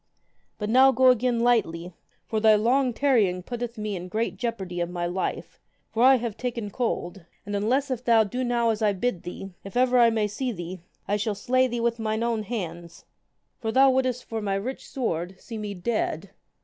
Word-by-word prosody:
But 210 0 -3
now 260 +2 +7
go 260 +1 +5
again 245 -1 +2
lightly, 185 -8 +1 0.3
for 220 - -1
thy 215 0 +6
long 250 +5 +2
tarrying 220 -9 +2
putteth 240 +1 -5
me 210 -1 -3
in 180 0 -6
great 220 +5 -2
jeopardy 195 -7 -4
of 170 - -1
my 175 -1 -3
life, 180 +2 -3 0.3
for 225 - -1
I 265 +2 +7
have 235 -4 -3
taken 230 -4 -4
cold. 195 -6 -3 0.2
And 205 0 -4
unless 255 +7 +1
if 250 -1 -3
thou 230 -2 +5
do 245 +5 -3
now 240 -2 +2
as 220 0 -3
I 210 -2 +3
bid 195 -2 -2
thee, 190 +2 -7
if 195 +4 -6
ever 250 0 +4
I 235 -1 +7
may 220 -2 0
see 245 +5 -3
thee, 175 -2 -7 0.3
I 205 - +1
shall 210 0 -1
slay 255 +5 +2
thee 240 -1 -3
with 235 0 0
mine 220 0 -1
own 235 -2 0
hands, 175 -6 -6 0.5
for 220 -2 -2
thou 265 +2 +6
wouldest 255 -1 0
for 225 -1 -4
my 200 -2 -1
rich 240 +7 -5
sword 185 -7 -3
see 225 -2 -8
me 205 -1 -5
dead. 215 +5 -2
225 Hz, 200 wpm, -26 LUFS, 195-245 Hz, 0.5 s, now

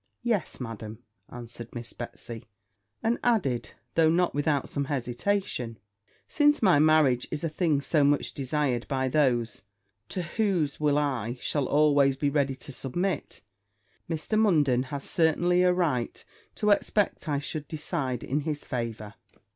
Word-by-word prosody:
'Yes, 225 -7 -1
Madam,' 110 -3 -7 0.3
answered 120 -1 -9
Miss 120 -1 -6
Betsy; 120 -1 -8 0.6
and 230 +2 +1
added, 180 - +1 0.2
though 160 -1 +4
not 175 +2 +2
without 145 -1 0
some 140 -1 -2
hesitation, 125 - -2 0.5
'Since 295 -3 +3
my 185 -8 +6
marriage 150 -5 +4
is 150 - -4
a 165 - 0
thing 155 -2 +1
so 150 +1 +2
much 145 0 +2
desired 135 -3 -1
by 130 -2 0
those 125 -5 +1 0.5
to 180 - -3
whose 170 -5 0
will 145 -1 +2
I 130 -5 -1
shall 145 0 -1
always 145 -2 +4
be 140 +1 0
ready 140 -2 +1
to 135 - -10
submit, 165 +7 -3 0.7
Mr. 165 +7 -1
Munden 145 - +3
has 140 -1 -4
certainly 175 +2 +2
a 180 0 +5
right 155 -10 -1 0.3
to 210 - +2
expect 205 -4 +1
I 145 - +1
should 145 +1 -4
decide 135 -5 -3
in 140 +3 -1
his 150 -1 -4
favour.' 115 -4 -4
145 Hz, 145 wpm, -27 LUFS, 125-165 Hz, 0.7 s, my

